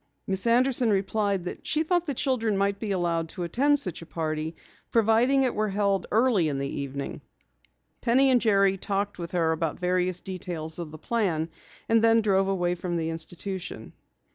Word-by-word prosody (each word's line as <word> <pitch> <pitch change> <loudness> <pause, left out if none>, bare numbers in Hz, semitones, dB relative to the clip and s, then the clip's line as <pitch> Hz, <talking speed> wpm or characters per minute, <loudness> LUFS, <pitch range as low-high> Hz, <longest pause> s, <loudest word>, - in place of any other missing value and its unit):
Miss 190 +3 -1
Anderson 245 0 +3
replied 200 -1 0
that 180 - -7
she 310 +1 +1
thought 350 +1 +1
the 285 - -1
children 230 -6 0
might 200 0 0
be 220 - -4
allowed 170 -4 0
to 180 - -5
attend 280 - +2
such 180 -11 -2
a - - -9
party, 155 -1 -3 0.3
providing 230 +4 +3
it 255 - +1
were 215 0 0
held 200 -1 0
early 220 -6 +3
in 140 - -2
the 140 0 -2
evening. 140 0 -5 0.8
Penny 265 +3 +4
and 245 -2 +4
Jerry 195 -3 +3
talked 200 0 -2
with 170 -1 -5
her 165 -2 +2
about 160 -1 -1
various 180 0 0
details 175 -4 -5
of 170 -3 -5
the 155 - -10
plan, 170 -5 -1 0.4
and 225 0 +4
then 230 0 +5
drove 195 -2 +2
away 180 -2 0
from 175 0 -4
the 165 -1 -1
institution. 165 - -6
195 Hz, 180 wpm, -26 LUFS, 170-225 Hz, 0.8 s, then